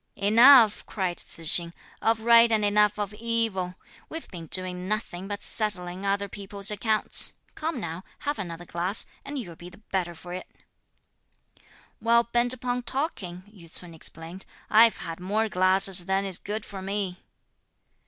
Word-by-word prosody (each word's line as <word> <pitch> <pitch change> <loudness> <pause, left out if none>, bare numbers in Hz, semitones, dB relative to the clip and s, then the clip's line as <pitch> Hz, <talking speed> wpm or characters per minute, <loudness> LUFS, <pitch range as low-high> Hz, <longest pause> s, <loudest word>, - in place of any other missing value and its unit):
"Enough," 225 +2 +6
cried 185 -4 -3
Tzu 165 - -3
hsing, 170 +2 +5 0.3
"of 225 0 +1
right 235 0 +6
and 215 -2 +2
enough 210 0 +2
of 205 -1 -4
evil; 220 -5 -2 0.3
we've 325 0 -7
been 170 -3 -9
doing 185 0 +1
nothing 195 -3 -4
but 205 0 -6
settling 190 -3 -2
other 200 0 -1
people's 200 +1 -3
accounts; 215 +1 +2 0.2
come 315 -3 -4
now, 170 -2 -6
have 290 0 -4
another 175 -2 -7
glass, 175 +4 +2 0.2
and 285 +1 -7
you'll 180 -10 -7
be 175 +2 -12
the 180 - -17
better 185 -5 -4
for 175 +2 -10
it!" 185 - -7 1.5
"While 235 +1 +3
bent 240 +1 +1
upon 250 -1 +2
talking," 230 - -4
Yü 190 -5 -17
ts'un 175 -2 -9
explained, 165 +3 -7 0.2
"I've 225 +1 +6
had 165 0 -7
more 210 +5 -1
glasses 185 -1 +3
than 195 +1 0
is 190 -2 -2
good 210 +1 -5
for 195 -2 -8
me." 195 -1 -4
200 Hz, 155 wpm, -26 LUFS, 180-225 Hz, 1.5 s, Enough